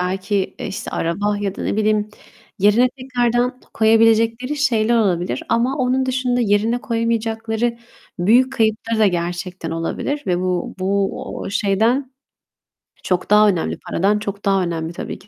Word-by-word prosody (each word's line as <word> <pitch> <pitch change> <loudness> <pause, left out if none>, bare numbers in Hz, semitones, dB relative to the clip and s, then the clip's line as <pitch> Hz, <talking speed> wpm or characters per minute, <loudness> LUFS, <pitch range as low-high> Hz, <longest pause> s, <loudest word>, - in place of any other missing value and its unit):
belki 190 +2 -1
işte 210 +4 -5
araba 205 +5 -1
ya 200 -2 -2
da, - - -6
ne - - -1
bileyim, 215 -1 +1 0.5
yerine 210 +6 +4
tekrardan 250 -1 -1
koyabilecekleri 225 +4 +3
şeyler 235 -5 +2
olabilir. 175 - 0
Ama 245 +4 +1
onun 260 0 +1
dışında 255 -1 0
yerine 225 +2 +1
koyamayacakları 230 0 -1 0.4
büyük 240 +9 +4
kayıpları 225 -2 0
da 215 - +5
gerçekten 175 -1 -3
olabilir 165 - -3
ve 180 -1 +1
bu 180 -1 -2
bu 195 +1 0 0.2
o - - -5
şeyden 225 +7 +1 0.9
çok 180 -1 -1
daha 210 +1 +6
önemli, 175 -5 -1
paradan 205 +4 +1
çok 200 -1 -6
daha 195 -1 +2
önemli 165 -1 -3
tabii - - -6
ki. 195 - -20
215 Hz, 140 wpm, -20 LUFS, 190-240 Hz, 0.9 s, daha